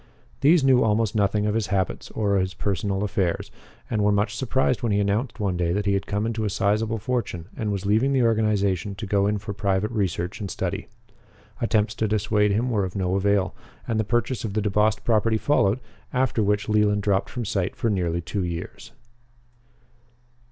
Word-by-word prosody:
These 150 Hz, +3 st, +5 dB
knew 130 Hz, -2 st, +5 dB
almost 110 Hz, -1 st, +1 dB
nothing 105 Hz, 0 st, +1 dB
of 105 Hz, -, +1 dB
his 110 Hz, -2 st, 0 dB
habits 95 Hz, -1 st, -1 dB
or 105 Hz, -2 st, 0 dB
of 100 Hz, -, +3 dB
his 95 Hz, 0 st, -3 dB
personal 100 Hz, 0 st, -1 dB
affairs, 95 Hz, -4 st, -1 dB, 0.4 s
and 105 Hz, -2 st, 0 dB
were 105 Hz, -, +4 dB
much 100 Hz, +2 st, +1 dB
surprised 130 Hz, -1 st, 0 dB
when 115 Hz, -3 st, 0 dB
he 100 Hz, -, +2 dB
announced 105 Hz, +5 st, -1 dB
one 100 Hz, -3 st, 0 dB
day 85 Hz, -1 st, 0 dB
that 100 Hz, +1 st, -1 dB
he 100 Hz, -, +2 dB
had 100 Hz, -, -1 dB
come 105 Hz, +2 st, -1 dB
into 115 Hz, -1 st, -2 dB
a 105 Hz, -, 0 dB
sizable 105 Hz, +3 st, 0 dB
fortune 105 Hz, -7 st, -3 dB
and 110 Hz, -3 st, -2 dB
was 100 Hz, -1 st, -3 dB
leaving 110 Hz, +7 st, +3 dB
the 130 Hz, -2 st, +3 dB
organization 105 Hz, -4 st, +1 dB
to 100 Hz, -, -6 dB
go 100 Hz, 0 st, +2 dB
in 105 Hz, 0 st, +1 dB
for 100 Hz, 0 st, -6 dB
private 100 Hz, +1 st, 0 dB
research 95 Hz, -3 st, -2 dB
and 100 Hz, -2 st, -4 dB
study. -, -, -3 dB, 0.7 s
Attempts 110 Hz, -2 st, +1 dB
to 110 Hz, +1 st, -1 dB
dissuade 105 Hz, 0 st, +2 dB
him 120 Hz, +5 st, 0 dB
were 105 Hz, -4 st, +1 dB
of 95 Hz, -1 st, -4 dB
no 95 Hz, -2 st, 0 dB
avail, 100 Hz, -1 st, +1 dB, 0.3 s
and 110 Hz, -1 st, 0 dB
the -, -, +2 dB
purchase 120 Hz, +3 st, -1 dB
of 105 Hz, -3 st, -4 dB
the 110 Hz, -, +1 dB
DeBost 105 Hz, +1 st, +1 dB
property 110 Hz, -1 st, +2 dB
followed, 110 Hz, -2 st, +2 dB, 0.3 s
after 125 Hz, -3 st, +1 dB
which 105 Hz, 0 st, +1 dB
Leland 105 Hz, -1 st, +2 dB
dropped 100 Hz, -1 st, +1 dB
from 120 Hz, -2 st, -4 dB
sight 95 Hz, -3 st, -1 dB
for 115 Hz, -, 0 dB
nearly 85 Hz, -3 st, 0 dB
two 95 Hz, +3 st, -3 dB
years. 90 Hz, +6 st, -6 dB
105 Hz, 200 wpm, -24 LUFS, 100-110 Hz, 0.7 s, These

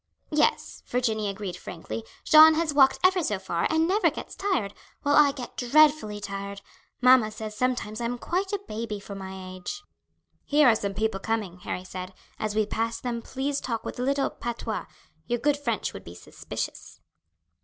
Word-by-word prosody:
"Yes," 305 Hz, 0 st, +1 dB
Virginie 220 Hz, -4 st, 0 dB
agreed 195 Hz, -2 st, -5 dB
frankly, 115 Hz, -10 st, -7 dB, 0.2 s
"Jeanne 315 Hz, +1 st, +8 dB
has 320 Hz, -2 st, 0 dB
walked 270 Hz, -2 st, +5 dB
ever 370 Hz, -1 st, +4 dB
so 210 Hz, -, 0 dB
far 175 Hz, -3 st, -1 dB
and 320 Hz, +1 st, +2 dB
never 400 Hz, +4 st, +3 dB
gets -, -, -8 dB
tired, 370 Hz, -, -1 dB, 0.3 s
while 285 Hz, 0 st, +3 dB
I 295 Hz, -2 st, +7 dB
get 260 Hz, -3 st, -8 dB
dreadfully 285 Hz, -4 st, +3 dB
tired; 200 Hz, 0 st, -6 dB, 0.4 s
mamma 250 Hz, -3 st, +6 dB
says 215 Hz, 0 st, -7 dB
sometimes 245 Hz, -3 st, -1 dB
I -, -, -1 dB
am 245 Hz, +1 st, -2 dB
quite 370 Hz, +9 st, -2 dB
a 405 Hz, -, -1 dB
baby 215 Hz, -1 st, -4 dB
for 200 Hz, 0 st, -9 dB
my 190 Hz, -1 st, -7 dB, 0.2 s
age." 410 Hz, -, -6 dB, 0.6 s
"Here 295 Hz, -1 st, +4 dB
are 230 Hz, -, +6 dB
some 200 Hz, -2 st, -3 dB
people 215 Hz, -1 st, 0 dB
coming," 205 Hz, -4 st, -2 dB
Harry 180 Hz, 0 st, -4 dB
said; 185 Hz, 0 st, -7 dB, 0.2 s
"as 215 Hz, -1 st, -2 dB
we 215 Hz, -1 st, +3 dB
pass 230 Hz, +2 st, -2 dB
them 240 Hz, -2 st, -3 dB
please 275 Hz, +3 st, -2 dB
talk 230 Hz, -3 st, -3 dB
with -, -, -6 dB
a -, -, -1 dB
little 275 Hz, +2 st, +1 dB
patois. 235 Hz, -2 st, -4 dB, 0.4 s
Your 240 Hz, -, 0 dB
good 290 Hz, +4 st, +2 dB
French 235 Hz, -8 st, -2 dB
would 95 Hz, -, -9 dB
be 85 Hz, -, -11 dB
suspicious." -, -, -7 dB
230 Hz, 180 wpm, -26 LUFS, 205-285 Hz, 0.6 s, Jeanne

